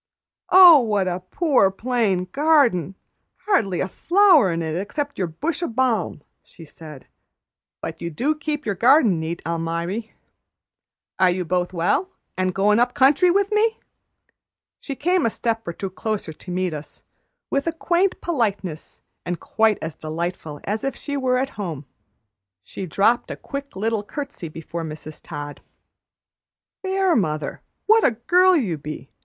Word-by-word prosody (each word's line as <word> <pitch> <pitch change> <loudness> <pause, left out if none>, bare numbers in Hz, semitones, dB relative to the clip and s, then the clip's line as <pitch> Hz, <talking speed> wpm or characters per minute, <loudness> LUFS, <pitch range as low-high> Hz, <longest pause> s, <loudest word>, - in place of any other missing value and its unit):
"Oh, 360 -4 +9
what 210 -6 0
a 180 0 -2
poor, 250 - +2
plain 205 -3 0
garden! 275 - +2 0.5
Hardly 200 - +1
a - - -1
flower 345 - +4
in 165 0 -2
it 160 -1 -3
except 285 - -4
your 185 - 0
bush 300 - -3
o' 345 - -1
balm!" 230 - -1 0.2
she 165 - -15
said. 150 -2 -12 0.8
"But - - -6
you 170 - -3
do 260 - 0
keep 300 -1 -4
your 205 - 0
garden 230 - +4
neat, 160 +2 -4
Almiry. 170 +6 -3 1.1
Are 185 -1 +5
you 180 0 -1
both 180 +1 -1
well, 180 - 0 0.3
an' 185 0 0
goin' 200 +4 +2
up 245 +2 +1
country 285 +6 +5
with 400 +3 +2
me?" 440 +1 +2 1.0
She 275 - -6
came 355 +6 +1
a - - +3
step 225 -1 -3
or 170 - -3
two 190 +2 -5
closer 205 -4 -4
to 180 - -14
meet 180 -1 -1
us, 150 0 -9 0.5
with 280 +4 0
quaint 360 +3 +1
politeness 205 - -3 0.2
and 175 -1 -4
quite 220 -2 +1
as 160 -1 -5
delightful 160 -1 -5
as 210 +2 -3
if 275 - -2
she 285 - -5
were 260 -2 +1
at 265 +1 -1
home. 160 -7 -5 0.8
She 190 - -7
dropped 205 +8 +2
a - - -4
quick 280 -4 -7
little 220 +2 -1
curtsey 210 - -7
before 165 +2 -6
Mrs. 155 -1 -8
Todd. 145 0 -8 1.2
"There, 380 -2 +1
mother, 155 -8 -1 0.2
what 445 +1 +5
a - - +6 0.2
girl 365 +2 +5
you 195 - -1
be! 145 -3 -8
210 Hz, 155 wpm, -22 LUFS, 170-285 Hz, 1.2 s, Oh